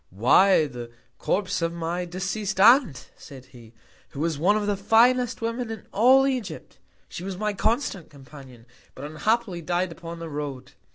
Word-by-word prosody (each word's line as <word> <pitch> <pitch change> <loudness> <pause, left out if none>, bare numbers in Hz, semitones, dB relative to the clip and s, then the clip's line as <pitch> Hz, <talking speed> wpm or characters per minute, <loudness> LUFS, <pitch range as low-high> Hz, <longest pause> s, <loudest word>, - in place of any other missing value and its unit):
Why, 150 - +4
the 120 -4 -8 0.3
Corpse 190 -2 -1
of 165 0 0
my 170 +1 -3
deceased 190 +2 -4
Aunt, 220 - +4
said 130 -2 -13
he, 120 -3 -17 0.3
who - - -10
was 165 +1 -1
one 200 +6 +3
of 210 - -2
the 205 0 0
finest 240 +4 +2
Women 230 +1 -3
in 220 -3 -8
all 260 +6 +5
Egypt. 255 -6 -4 0.3
She 175 - -8
was 190 -1 -5
my 210 +1 -2
constant 215 - -2
Companion; 135 -4 -15 0.3
but 135 - -8
unhappily 185 +4 -1
died 175 +2 -2
upon 165 0 -9
the 165 0 -7
Road. 145 -4 -6
180 Hz, 165 wpm, -24 LUFS, 150-215 Hz, 0.3 s, all